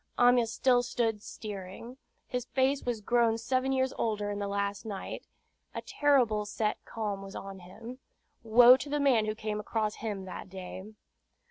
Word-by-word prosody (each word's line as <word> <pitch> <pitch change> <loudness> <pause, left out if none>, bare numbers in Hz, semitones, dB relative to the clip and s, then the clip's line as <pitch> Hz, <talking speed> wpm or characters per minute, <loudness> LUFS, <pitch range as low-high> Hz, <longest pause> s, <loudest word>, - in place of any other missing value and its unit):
Amyas 245 -2 +4
stood 245 0 +3
still 230 -3 0
steering. 205 +4 -8 0.3
His 250 -1 -3
face 265 +2 +1
was 240 -3 -3
grown 230 +1 +2
seven 255 +3 0
years 260 0 +1
older 210 -2 -1
in 205 - -4
the 200 - -2
last 200 0 -2
night. 205 -3 -6 0.5
A - - -4
terrible 250 -8 +2
set 210 0 -2
calm 210 -3 -4
was 195 0 -9
on 195 -1 -7
him. 225 +8 -10 0.4
Woe 240 +3 +8
to 285 - -6
the 295 +1 0
man 255 -6 +4
who 215 - -1
came 215 -1 -3
across 215 0 -2
him 205 -4 -4
that 190 0 -8
day! 185 0 -8
225 Hz, 165 wpm, -30 LUFS, 205-245 Hz, 0.5 s, Woe